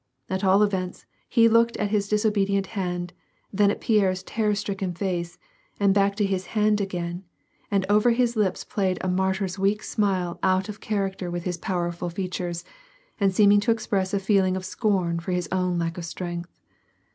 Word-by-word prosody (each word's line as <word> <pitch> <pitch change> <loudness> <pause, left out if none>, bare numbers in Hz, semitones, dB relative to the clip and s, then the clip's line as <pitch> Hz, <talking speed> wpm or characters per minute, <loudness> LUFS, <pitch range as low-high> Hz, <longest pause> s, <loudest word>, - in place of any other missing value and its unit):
At 190 +1 -1
all 195 +2 +5
events, 190 -3 -2 0.2
he 230 -2 +5
looked 230 +1 +3
at 205 -1 -1
his 205 -2 +1
disobedient 200 -2 +1
hand, 180 -3 -3 0.4
then 200 +1 +4
at - - -1
Pierre's 190 -4 +2
terror 210 0 0
stricken 195 -3 -3
face 175 -1 -3 0.4
and 200 -1 +4
back 200 0 +2
to 205 -1 +1
his 190 -2 -2
hand 210 0 +3
again, 175 -2 -4 0.5
and 200 -3 +1
over 210 +4 +4
his 240 0 +2
lips 210 -4 0
played 190 -3 -1
a - - -2
martyr's 190 +1 0
weak 200 +2 +1
smile 185 -4 -1
out 190 +2 +1
of 210 0 -7
character 195 -3 -2
with 175 0 -4
his 180 -1 -3
powerful 175 -1 -2
feat 180 +1 -4
ures, 175 -2 -3 0.6
and 200 -2 +3
seeming 205 +1 +5
to 205 - -2
express 205 -4 0
a 200 - +1
feeling 190 -2 +2
of 185 - -6
scorn 185 -5 0
for 175 +2 -3
his 180 -1 -1
own 180 -1 0
lack 170 +1 -2
of 170 - -5
strength. 175 0 -6
195 Hz, 180 wpm, -25 LUFS, 180-205 Hz, 0.6 s, all